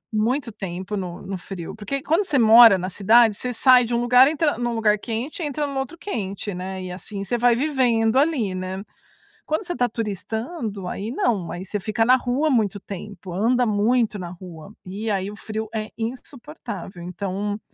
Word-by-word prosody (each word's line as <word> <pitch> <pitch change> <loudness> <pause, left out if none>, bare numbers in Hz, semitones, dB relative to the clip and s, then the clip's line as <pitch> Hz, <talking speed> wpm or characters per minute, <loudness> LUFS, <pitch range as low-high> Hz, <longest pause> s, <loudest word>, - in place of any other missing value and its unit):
muito 240 +3 0
tempo 190 -1 -5
no 180 -3 -5
no 190 0 -5
frio, 175 -2 -7
porque 265 +6 -4
quando 335 +7 +2
você 300 -6 +1
mora 225 -3 +8
na 185 0 -3
cidade 220 +3 +4
você 250 +4 -3
sai 250 +1 +5
de 235 0 -2
um 235 - +1
lugar 250 +2 +6
entra 305 -2 +1
em - - -2
um 235 - -2
lugar 215 -2 +3
quente 235 - -4
e - - -1
entra 295 +1 -2
no 280 -1 -3
outro 270 +5 -5
quente, 205 - -4
né, 185 +1 -5
e 180 - -6
assim 195 +2 -6
você 200 +5 -2
vai 240 0 +4
vivendo 245 -5 +2
ali, 270 - +1
né, 185 +1 -5 0.6
quando 310 +6 -1
você 350 - -3
está 245 -6 +1
turistando, 220 - -4
aí 210 +5 -4
não, 210 -10 0
aí 175 +2 -6
você 205 +2 -3
fica 215 +3 0
na 255 +3 +6
rua 260 +5 0
muito 215 -6 +1
tempo, 195 -1 -8
anda 235 +7 +2
muito 220 +1 +1
na 175 -2 -6
rua, 180 +1 -11
e 200 +4 -5
aí 195 -1 -1
o 210 - -10
frio 220 +1 -5
é 215 -1 -4
insuportável 235 - -7
então 200 +4 -4
220 Hz, 195 wpm, -23 LUFS, 195-250 Hz, 0.6 s, mora